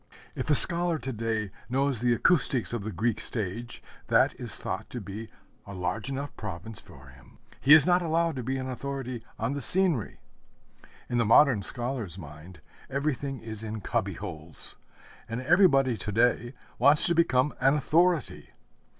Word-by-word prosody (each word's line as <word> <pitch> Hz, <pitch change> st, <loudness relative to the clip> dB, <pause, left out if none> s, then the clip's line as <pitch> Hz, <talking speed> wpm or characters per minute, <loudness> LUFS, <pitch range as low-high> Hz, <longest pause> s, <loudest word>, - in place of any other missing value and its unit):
If -, -, -5 dB
a 150 Hz, -, +5 dB
scholar 170 Hz, +2 st, +5 dB
to 135 Hz, -3 st, -5 dB
day 110 Hz, -2 st, -3 dB, 0.2 s
knows 135 Hz, -2 st, 0 dB
the 120 Hz, 0 st, +2 dB
acoustics 135 Hz, -7 st, +1 dB
of 115 Hz, -4 st, -3 dB
the 110 Hz, -, -4 dB
Greek 110 Hz, +5 st, -1 dB
stage, 115 Hz, +2 st, -4 dB, 0.2 s
that -, -, +3 dB
is -, -, +2 dB
thought -, -, -5 dB
to 125 Hz, -, -6 dB
be 105 Hz, +2 st, -8 dB, 0.4 s
a 100 Hz, -, -8 dB
large 105 Hz, +7 st, -3 dB
enough 140 Hz, +1 st, -5 dB
province 95 Hz, +5 st, -7 dB
for 65 Hz, 0 st, -15 dB
him. 65 Hz, -1 st, -19 dB, 0.2 s
He 140 Hz, -, +6 dB
is 155 Hz, -2 st, +8 dB
not 180 Hz, 0 st, +3 dB
allowed 165 Hz, -1 st, 0 dB
to 125 Hz, -, -4 dB
be 135 Hz, +3 st, -2 dB
an 130 Hz, 0 st, -4 dB
authority 130 Hz, -2 st, -5 dB
on 115 Hz, +4 st, -2 dB
the 140 Hz, -, -4 dB
scenery. 175 Hz, -, +3 dB, 0.9 s
In 120 Hz, -1 st, -1 dB
the -, -, +3 dB
modern 115 Hz, 0 st, +5 dB
scholar's 120 Hz, -, -4 dB
mind 80 Hz, +1 st, -12 dB, 0.3 s
everything 140 Hz, -1 st, -3 dB
is 110 Hz, -1 st, -7 dB
in 110 Hz, -1 st, -6 dB
cubby -, -, -2 dB
holes; 80 Hz, 0 st, -8 dB, 0.5 s
and 115 Hz, +1 st, -3 dB
everybody 135 Hz, -4 st, +3 dB
to 105 Hz, +2 st, -5 dB
day 120 Hz, +3 st, +1 dB, 0.2 s
wants 145 Hz, +4 st, +6 dB
to 170 Hz, -, +2 dB
become 145 Hz, -4 st, +2 dB
an 135 Hz, +2 st, +3 dB
authority. 165 Hz, +1 st, +1 dB
125 Hz, 165 wpm, -27 LUFS, 110-140 Hz, 0.9 s, is